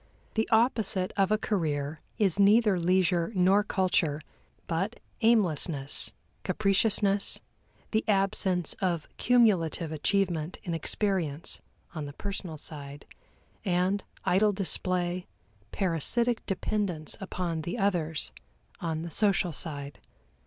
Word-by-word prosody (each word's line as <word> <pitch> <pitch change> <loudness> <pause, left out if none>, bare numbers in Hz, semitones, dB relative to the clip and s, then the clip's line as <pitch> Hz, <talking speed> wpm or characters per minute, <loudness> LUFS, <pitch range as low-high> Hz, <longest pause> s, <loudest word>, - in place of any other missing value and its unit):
The 220 0 0
opposite 220 -5 +2
of 195 0 +2
a 215 - +4
career 155 -8 -2 0.2
is 200 -4 +2
neither 205 -1 +5
leisure 180 0 +2
nor 190 +3 +4
culture, 180 -7 +1 0.5
but 190 +7 -2 0.2
aimlessness, 165 - +2 0.3
capriciousness, 200 +1 +2 0.5
the 220 0 +1
absence 195 -4 +1
of 175 -5 0
cumulative 190 -10 +3
achievement 170 0 0
in 175 -4 -3
experience, 165 -2 -1 0.3
on 155 -4 -4
the 145 - -8
personal 185 -3 -5
side, 145 -1 -8 0.6
and 185 +1 +1 0.2
idle 205 +3 +3
display, 180 -2 -1 0.4
parasitic 215 - 0
dependence 190 -5 -2
upon 180 -4 -3
the 175 +7 -4
others, 170 -7 0 0.5
on 160 -1 -3
the 170 - -6
social 195 -1 +2
side. 145 -2 -3
185 Hz, 105 wpm, -29 LUFS, 160-200 Hz, 0.6 s, neither